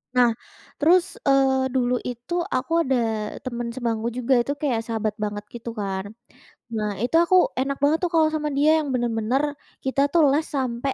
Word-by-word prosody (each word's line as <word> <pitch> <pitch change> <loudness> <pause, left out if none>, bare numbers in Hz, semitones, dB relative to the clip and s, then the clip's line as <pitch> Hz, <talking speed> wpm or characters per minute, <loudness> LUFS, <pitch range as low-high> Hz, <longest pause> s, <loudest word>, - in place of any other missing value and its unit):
Nah, 245 -1 +5 0.5
terus, 345 +4 +3
eee, 265 -1 +3
dulu 250 -1 +1
itu 245 +5 -6 0.2
aku 255 +4 -2
ada 225 -5 -1
temen 240 -2 -4
sebangku 230 -3 -2
juga 250 0 +3
itu 260 +4 0
kayak 275 -5 -1
sahabat 220 -2 -2
banget 205 0 -3
gitu 235 0 -6
kan. 195 -2 -3 0.7
Nah, 210 -1 -1
itu 250 +6 -1
aku 355 +2 +2 0.2
enak 275 +1 -1
banget 300 +3 +3
tuh 350 - -2
kalau 315 -1 +5
sama 305 -1 -2
dia 310 +3 +4
yang 290 - -5
bener-bener, 240 +2 0 0.4
kita 265 +1 +1
tuh 340 - +5
les 305 +3 +1
sampai 260 0 -1
255 Hz, 170 wpm, -24 LUFS, 230-280 Hz, 0.7 s, Nah